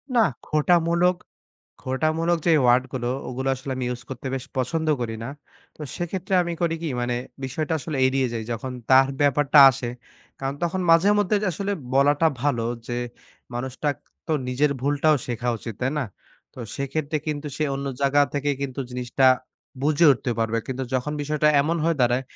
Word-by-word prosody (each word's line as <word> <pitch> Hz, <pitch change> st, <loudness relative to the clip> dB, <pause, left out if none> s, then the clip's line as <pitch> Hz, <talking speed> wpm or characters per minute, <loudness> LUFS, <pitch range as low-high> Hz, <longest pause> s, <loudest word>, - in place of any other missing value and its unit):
নাহ, 225 Hz, -6 st, +5 dB, 0.2 s
খোঁটা 155 Hz, +3 st, +3 dB
মূলক 175 Hz, +2 st, +3 dB, 0.7 s
খোটা 130 Hz, +4 st, 0 dB
মূলক 170 Hz, +1 st, +1 dB
যে -, -, +5 dB
ওয়ার্ড 125 Hz, +1 st, +4 dB
গুলো 120 Hz, -2 st, -2 dB, 0.2 s
ওগুলো 130 Hz, +2 st, -3 dB
আসলে 130 Hz, +1 st, -6 dB
আমি 130 Hz, -, -2 dB
ইউজ 125 Hz, 0 st, -4 dB
করতে 130 Hz, 0 st, -7 dB
বেশ 130 Hz, -1 st, -4 dB
পছন্দ 155 Hz, +5 st, -1 dB
করি 115 Hz, -2 st, -3 dB
না। -, -, -5 dB, 0.5 s
তো -, -, -20 dB, 0.2 s
সেক্ষেত্রে 185 Hz, +2 st, -3 dB
আমি 175 Hz, -, -3 dB
করি 165 Hz, -1 st, +1 dB
কি? 165 Hz, -, -2 dB
মানে 120 Hz, 0 st, -1 dB, 0.3 s
বিষয়টা 150 Hz, +5 st, -3 dB
আসলে 150 Hz, 0 st, -4 dB
এড়িয়ে 130 Hz, 0 st, +1 dB
যাই। 115 Hz, -1 st, -3 dB
যখন 120 Hz, +3 st, -5 dB, 0.2 s
তার 135 Hz, 0 st, +7 dB
ব্যাপারটা 145 Hz, +1 st, +4 dB
আসে। 130 Hz, -2 st, -5 dB, 0.5 s
কারণ 135 Hz, 0 st, -3 dB
তখন 175 Hz, +2 st, 0 dB
মাঝে 165 Hz, +5 st, +6 dB
মধ্যে 205 Hz, +1 st, +2 dB, 0.2 s
আসলে 200 Hz, +5 st, -2 dB, 0.2 s
বলাটা 145 Hz, +3 st, +4 dB, 0.2 s
ভালো। 125 Hz, -6 st, +1 dB, 0.2 s
যে, 120 Hz, -, -3 dB, 0.6 s
মানুষটাক 130 Hz, +4 st, -2 dB, 0.3 s
তো 160 Hz, -, -1 dB, 0.2 s
নিজের 140 Hz, +4 st, +2 dB
ভুলটাও 145 Hz, +3 st, +3 dB
শেখা 120 Hz, 0 st, -3 dB
উচিত। 115 Hz, 0 st, -7 dB
তাই 130 Hz, +1 st, +1 dB
না? 145 Hz, -, 0 dB, 0.5 s
তো -, -, -14 dB, 0.2 s
সেক্ষেত্রে 145 Hz, +2 st, -2 dB
কিন্তু 150 Hz, -1 st, -3 dB
সে 155 Hz, -, 0 dB
অন্য 140 Hz, +1 st, -4 dB
জাগা 140 Hz, +1 st, +4 dB
থেকে 145 Hz, 0 st, 0 dB
কিন্তু 140 Hz, -1 st, -4 dB
জিনিসটা 125 Hz, +1 st, +1 dB, 0.6 s
বুঝে 155 Hz, +3 st, +4 dB
উঠতে 125 Hz, -1 st, -3 dB
পারবে। 115 Hz, 0 st, 0 dB
কিন্তু 130 Hz, 0 st, -3 dB
যখন 130 Hz, +3 st, -1 dB
বিষয়টা 150 Hz, +1 st, +1 dB
এমন 165 Hz, +4 st, 0 dB
হয়ে 165 Hz, -1 st, +2 dB
দাঁড়ায়, 125 Hz, +1 st, +3 dB
140 Hz, 175 wpm, -24 LUFS, 130-155 Hz, 0.7 s, তার